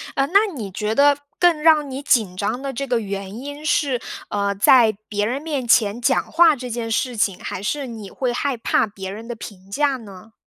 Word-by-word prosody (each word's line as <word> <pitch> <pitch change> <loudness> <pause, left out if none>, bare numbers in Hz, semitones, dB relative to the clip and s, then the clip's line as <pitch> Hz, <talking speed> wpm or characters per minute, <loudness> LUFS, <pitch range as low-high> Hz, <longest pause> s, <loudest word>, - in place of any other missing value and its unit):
呃， 275 0 +1
那 400 +4 +3
你 210 -8 -6
觉 210 +3 -2
得 285 +1 +5 0.2
更 345 -4 +3
让 305 -2 +4
你 265 +1 -5
紧 220 -9 +2
张 220 +6 -2
的 275 -1 -4
这 275 +2 -4
个 240 -2 +1
原 195 -1 -5
因 285 +3 -8
是， 295 -7 +1 0.3
呃， 200 -1 0
在 220 +1 +5
别 205 -1 -1
人 255 +6 -2
面 290 -6 -3
前 225 -1 +3
讲 - - +1
话 330 -2 +6
这 250 -1 -7
件 230 -1 -4
事 245 +1 -1
情， 195 -3 0
还 - - -5
是 270 +6 -2
你 220 -4 -8
会 255 -2 -2
害 275 0 -1
怕 230 - +1
别 195 -2 -7
人 220 +3 -9
的 240 - -5
评 195 -3 -11
价 285 +2 +1
呢？ 215 -1 -13
240 Hz, 230 characters per minute, -21 LUFS, 205-280 Hz, 0.3 s, 话